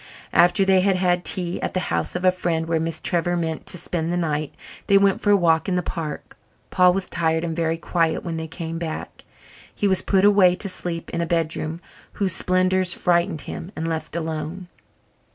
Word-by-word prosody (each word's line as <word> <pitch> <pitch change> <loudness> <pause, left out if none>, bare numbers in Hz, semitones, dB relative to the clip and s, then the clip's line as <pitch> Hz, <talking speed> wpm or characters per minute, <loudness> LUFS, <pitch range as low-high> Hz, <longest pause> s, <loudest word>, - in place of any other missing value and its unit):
After 180 +3 +4
they 190 -1 +4
had 195 0 +2
had 180 -1 +1
tea 175 -1 0
at - - -3
the - - +2
house - - -1
of 180 - -3
the 185 - +5
friend 170 -3 -2
where 165 -1 +1
Miss 165 0 -2
Trevor 175 0 0
meant 160 -2 -3
to - - +1
spend 170 -1 -3
the 175 - 0
night, 155 -3 -1 0.4
they 200 - +6
went 195 -1 +3
for 205 - 0
a 205 - +6
walk 165 -1 +2
in 185 - 0
the 180 - 0
park. 160 -3 -6 0.4
Paul 180 -1 +5
was 190 -1 -1
tired 160 -1 0
and 165 -1 -3
very 165 -1 0
quiet 165 -1 0
when 170 -2 -3
they 160 0 -4
came 165 0 -6
back. 160 -2 -6 0.5
He 205 - 0
was 190 -2 +2
put 195 0 +2
away 195 -3 +5
to 200 - 0
sleep 170 -2 -6
in 170 - -2
a 170 - -2
bedroom 165 0 -2 0.3
whose 195 -3 -1
splendours 185 0 +2
frightened 175 -2 +1
him, 175 - -7
and 165 - -3
left 160 0 -4
alone. 165 +2 -4
175 Hz, 205 wpm, -23 LUFS, 165-185 Hz, 0.5 s, they